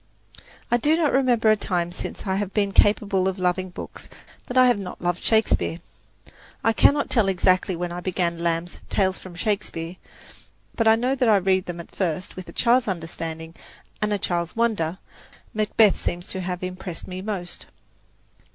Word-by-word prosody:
I 240 - +5
do 300 +6 +2
not 315 -4 +2
remember 245 -5 +4
a - - +5
time 175 -4 -1
since 180 - -7
I 190 -1 0
have 200 -1 -3
been 200 -2 +2
capable 200 -2 +3
of 190 0 -1
loving 185 0 0
books 175 - -9 0.4
that 250 - -3
I 255 - +8
have 245 -4 +3
not 185 -2 -7
loved 175 0 -2
Shakespeare. 220 -6 +2 0.8
I 225 - +3
cannot 285 +5 +4
tell 225 -5 +2
exactly 185 0 +2
when 175 +1 -3
I 175 - -4
began 175 -2 -1
Lamb's 170 0 -2
"Tales 190 -1 +1
from 185 -2 -11
Shakespeare"; 185 -4 -3 0.8
but 225 - +1
I 220 - +7
know 250 +4 0
that 250 -3 +2
I 215 - +6
read 190 -1 +1
them 175 -1 -5
at 170 - -11
first 180 -1 -2
with 185 -1 -8
a - - -8
child's 245 0 +3
understanding 165 -2 -5 0.5
and 210 0 0
a 205 - +2
child's 175 -3 -2
wonder. 210 -8 0 0.6
"Macbeth" 215 -1 +3
seems 175 0 -3
to 190 - -3
have 180 0 -4
impressed 185 -2 -5
me 185 0 -6
most. 190 -4 -5
190 Hz, 180 wpm, -24 LUFS, 175-220 Hz, 0.8 s, I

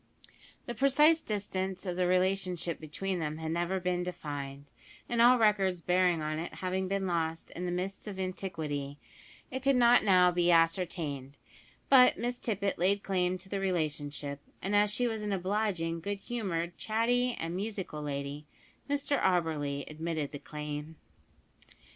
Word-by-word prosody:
The 240 - -4
precise 300 +5 +4
distance 190 -2 -3
of 180 -2 -2
the 180 0 +1
relationship 185 -2 0
between 180 +4 -3
them 155 -1 -3
had 160 0 -4
never 175 +3 0
been 180 0 -1
defined, 145 -6 -5 0.4
and 235 -1 +1
all 245 +2 +7
records 200 -5 +3
bearing 180 -2 +2
on 155 +1 -2
it 170 - -5
having 185 0 -2
been 195 0 -1
lost 165 -2 -2
in 180 - -5
the - - -1
mists 190 +4 -4
of 195 -2 -6
antiquity, 155 -7 -4 0.5
it 260 +1 -3
could 275 0 +3
not 245 0 +6
now 180 -3 +5
be 175 0 +2
ascertained; 165 -5 +1 0.5
but 255 -2 +7
Miss 245 +1 -2
Tippet 200 -5 -1
laid 195 +3 +2
claim 185 -1 0
to 190 - -12
the 195 +1 -3
relationship, 150 -6 -2 0.2
and 195 +2 -1
as 205 0 +4
she 245 +4 0
was 220 -2 -3
an 210 -1 -2
obliging, 185 -3 -1
good 200 +4 -3
humoured, 175 -8 -3
chatty, 245 +3 +1
and 165 +1 -3
musical 190 -6 -4
lady, 145 0 -4 0.4
Mr 285 0 0
Auberly 155 -6 +1
admitted 155 -2 -3
the 145 - -7
claim. 150 +1 -6
180 Hz, 155 wpm, -31 LUFS, 160-205 Hz, 0.5 s, all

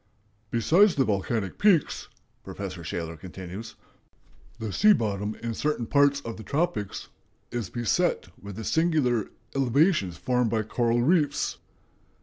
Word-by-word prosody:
"Besides 170 - +4
the 135 - +3
volcanic 100 -1 -1
peaks," 195 -7 +2 0.3
Professor 95 -3 -6
Shaler 85 0 -4
continues, 95 +5 -8 0.8
"the 110 -4 -5
sea 210 +1 +6
bottom 105 - -1
in 115 -1 -2
certain 150 0 -1
parts 140 +2 +3
of 115 -4 -6
the 110 - -8
tropics... 140 - -2 0.4
is 120 -6 -3
beset 120 - 0
with 100 -1 -8
the 110 - -6
singular 145 - +1 0.3
elevations 135 - +2
formed 125 +6 +1
by 110 -1 0
coral 120 +2 +1
reefs." 145 -1 +1
115 Hz, 130 wpm, -27 LUFS, 100-145 Hz, 0.8 s, sea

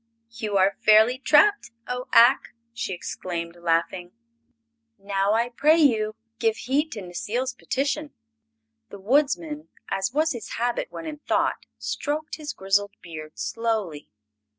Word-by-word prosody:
"You 215 -3 -2
are 195 +1 +3
fairly 220 +4 +6
trapped, 310 +10 +4 0.2
O 250 +1 -4
Ak!" 240 +2 +5 0.2
she 230 - -4
exclaimed, 170 -1 -5
laughing. 170 +1 -1 0.8
"Now, 200 0 0
I 230 +2 +1
pray 300 +6 +4
you, 220 -8 +3 0.2
give 225 -1 +1
heed 290 +4 0
to 210 - -6
Necile's 230 +9 -3
petition." 280 +4 -2 0.8
The - - -9
Woodsman, 190 - 0 0.2
as 195 +3 0
was 310 +4 +1
his 230 -4 -6
habit 240 +1 -1
when 330 - -7
in 305 -2 -6
thought, - - 0
stroked 305 +2 -3
his 300 -2 -5
grizzled 200 -1 0
beard 155 -3 -9
slowly. 220 -10 -2
225 Hz, 130 wpm, -25 LUFS, 190-270 Hz, 0.8 s, fairly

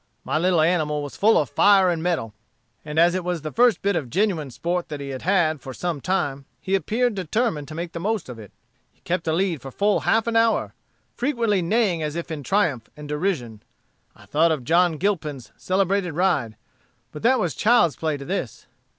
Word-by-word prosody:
"My 155 - -1
little 175 -1 +3
animal 155 -3 +1
was 145 - -7
full 220 +2 +4
of - - +1
fire 195 -3 +5
and 165 -2 -2
mettle, 160 -11 -1 0.5
and 150 0 -6
as 170 +1 +5
it 185 -1 -2
was 175 -3 -3
the 155 - -4
first 240 -1 +3
bit 200 -1 +1
of 130 -7 -2
genuine 175 - 0
sport 170 +7 -3
that 150 -2 -5
he 140 -1 -6
had 130 -1 -5
had 165 -6 +1
for 130 0 -8
some 170 -5 -3
time, 145 -7 -1
he 190 - -4
appeared 225 +5 +1
determined 190 - -1
to 155 - -8
make 170 +1 -5
the 170 - -6
most 210 +1 -2
of 125 -3 -9
it. 105 -3 -12 0.4
He - - -37
kept 175 -1 -2
the 160 - 0
lead 175 -3 0
for 135 - -8
full 205 +9 +1
half 225 -1 +2
an 230 -1 -2
hour, 225 0 +2 0.4
frequently 235 -7 0
neighing 185 -2 +1
as 150 0 -3
if 170 0 -5
in 155 -2 -4
triumph 150 - 0
and 150 0 -9
derision. 145 - -2 0.5
I - - -17
thought 160 +3 +2
of 150 -5 -2
John 170 +3 +3
Gilpin's 150 - -2
celebrated 190 -2 0
ride, 165 - 0 0.6
but 150 - -9
that 255 +3 +3
was 175 -4 -1
child's 210 - +3
play 155 0 -2
to 140 - -9
this. - - -4
170 Hz, 210 wpm, -23 LUFS, 150-195 Hz, 0.6 s, fire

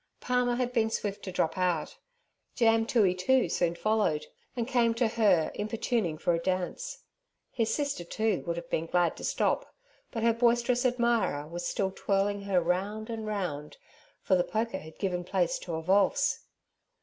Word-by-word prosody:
Palmer 250 -1 +1
had 250 0 -1
been 225 -2 +2
swift 205 -2 -3
to 190 - -4
drop 165 -1 -1
out, 175 -4 -1 0.6
Jam 225 -1 +3
Toohey, 205 -7 +3
too, 250 +8 +3
soon 170 -1 0
followed, 210 -5 +1 0.3
and 235 -2 -2
came 235 -3 +2
to 230 0 +2
her 205 -8 +3
importuning 215 -5 -1
for 175 +2 +1
a 165 - +1
dance. 185 - -3 0.5
His 225 -3 0
sister, 285 - -1
too, 215 +3 -1
would 170 - 0
have 170 0 -6
been 165 - -1
glad 175 0 +2
to - - -9
stop, - - 0 0.3
but 225 - -4
her 230 0 +4
boisterous 240 +2 +2
admirer 235 -12 +1
was 175 +2 -4
still 190 -1 -1
twirling 200 0 0
her 195 -2 +3
round 200 +6 -2
and 220 -1 -4
round, 175 -8 -4 0.5
for - - +1
the 180 - +3
polka 220 -1 -2
had 160 +1 -12
given 180 -3 -2
place 180 -1 0
to 170 -3 -5
a 160 - -4
valse. 195 +3 +2
205 Hz, 175 wpm, -29 LUFS, 175-230 Hz, 0.6 s, her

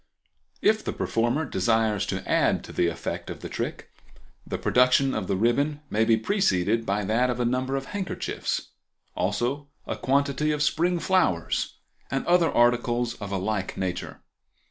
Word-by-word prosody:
If 215 0 +3
the - - -3
performer 120 +7 0
desires 110 -2 +1
to - - -4
add - - +2
to - - -10
the 85 - +2
effect 85 - -4
of - - -7
the - - -6
trick - - -5 0.6
the - - -3
production 125 +2 +3
of 95 - -2
the 100 - 0
ribbon 140 +8 +1
may 110 +1 +2
be 115 0 +4
preceded 115 - +1
by 100 +1 0
that 115 +5 +2
of 125 -1 -2
a 120 - +1
number 130 +2 0
of 135 0 -2
handkerchiefs, 195 +1 -3 0.5
also 120 +10 -1 0.2
a - - -3
quantity 140 +2 +1
of 150 -1 0
spring 175 +4 +2
flowers 165 - +1 0.3
and 135 - -2
other 175 -1 +4
articles 120 0 +2
of 100 -1 -5
a 100 - 0
like 95 0 -2
nature. 95 -2 -4
120 Hz, 165 wpm, -26 LUFS, 105-145 Hz, 0.6 s, be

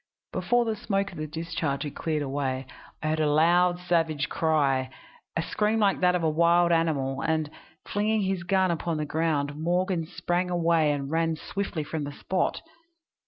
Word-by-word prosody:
Before 245 0 +2
the 225 -1 -1
smoke 200 -1 -1
of 175 - -9
the 155 - -3
discharge 160 -2 -3
had 145 - -5
cleared 155 -2 -2
away 135 -1 -2 0.4
I 155 - 0
heard 155 0 0
a 155 -1 +2
loud 175 +3 +4
savage 165 -4 0
cry 140 -5 +1 0.5
a 165 - +1
scream 215 +4 0
like 205 -3 +2
that 180 0 +3
of 175 - -1
a - - +3
wild 170 +2 +4
animal 145 -5 +1
and, 155 -2 0 0.3
flinging 215 +1 0
his 190 -2 -1
gun 185 +1 +2
upon 165 -1 -2
the 150 - -2
ground, 150 -2 0
Morgan 175 +1 0
sprang 180 0 -1
away 165 -3 +2
and 140 -1 -3
ran 165 0 +1
swiftly 180 -1 -4
from 150 0 -4
the 145 - -5
spot. 185 +5 -1
165 Hz, 175 wpm, -27 LUFS, 150-180 Hz, 0.5 s, loud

